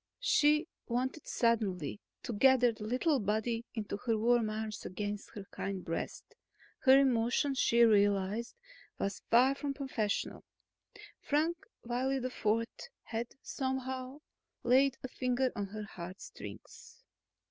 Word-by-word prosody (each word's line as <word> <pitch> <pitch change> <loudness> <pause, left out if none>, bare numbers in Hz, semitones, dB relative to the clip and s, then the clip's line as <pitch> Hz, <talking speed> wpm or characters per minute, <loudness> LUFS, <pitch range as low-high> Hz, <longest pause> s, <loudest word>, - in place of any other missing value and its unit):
She 300 -8 +4 0.2
wanted 260 +5 -2
suddenly 205 - 0 0.2
to 235 - -4
gather 250 +2 +5
the 220 -1 -9
little 260 +6 +2
body 220 +3 -1
into 210 -2 -3
her 225 +1 0
warm 230 0 +3
arms, 215 -1 -4
against 205 +2 -4
her 205 - -6
kind 195 -2 -4
breast. 165 - -5 0.5
Her 265 0 +7
emotion, 260 +1 +2
she 235 -2 +4
realized, 205 +1 +3 0.4
was 195 -1 -3
far 250 +4 +6
from 280 0 -4
professional; 250 -7 -2 0.8
Frank 315 +4 +1 0.3
Wiley 250 +3 0
IV 230 -3 0 0.4
had 230 +1 -3 0.2
somehow 260 +1 -3 0.4
laid 265 +2 +4
a - - -2
finger 255 0 0
on 205 -1 -2
her 215 +2 -6
heartstrings. 190 - -10
235 Hz, 120 wpm, -33 LUFS, 210-265 Hz, 0.8 s, Her